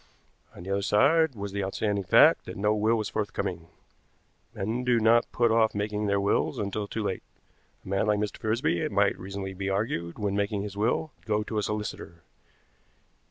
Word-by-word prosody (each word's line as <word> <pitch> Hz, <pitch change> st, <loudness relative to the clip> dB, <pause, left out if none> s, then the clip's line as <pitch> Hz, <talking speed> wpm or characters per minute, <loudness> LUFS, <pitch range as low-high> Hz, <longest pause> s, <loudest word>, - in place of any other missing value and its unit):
On -, -, -10 dB
the 95 Hz, -, -5 dB
other 100 Hz, 0 st, +1 dB
side 140 Hz, +9 st, +3 dB
was 100 Hz, -1 st, -5 dB
the 100 Hz, 0 st, -2 dB
outstanding 100 Hz, +1 st, -1 dB
fact -, -, +5 dB
that -, -, -7 dB
no 105 Hz, +2 st, +2 dB
will 110 Hz, +2 st, +2 dB
was 110 Hz, -2 st, -2 dB
forthcoming. 100 Hz, -6 st, -3 dB, 0.9 s
Men 110 Hz, +6 st, -2 dB
do 125 Hz, -2 st, +3 dB
not 115 Hz, +2 st, +3 dB
put 120 Hz, -1 st, +2 dB
off 110 Hz, -1 st, +3 dB
making 105 Hz, +1 st, -2 dB
their 100 Hz, 0 st, +2 dB
wills 100 Hz, +1 st, +1 dB
until 100 Hz, 0 st, -3 dB
too 110 Hz, +1 st, -4 dB
late. 95 Hz, -2 st, -2 dB, 0.6 s
A -, -, -12 dB
man 100 Hz, +2 st, 0 dB
like 105 Hz, 0 st, +3 dB
Mr. 105 Hz, 0 st, -3 dB
Frisby, 110 Hz, -, 0 dB
it -, -, -2 dB
might -, -, +2 dB
reasonably 95 Hz, 0 st, -6 dB
be 95 Hz, +1 st, -3 dB
argued, 95 Hz, -4 st, -2 dB
when 100 Hz, -2 st, -1 dB
making 100 Hz, 0 st, -1 dB
his 100 Hz, -1 st, -6 dB
will, 120 Hz, +9 st, 0 dB
would -, -, -29 dB
go 105 Hz, 0 st, +1 dB
to 110 Hz, 0 st, -3 dB
a -, -, 0 dB
solicitor. 100 Hz, -5 st, -5 dB
105 Hz, 195 wpm, -27 LUFS, 100-110 Hz, 0.9 s, fact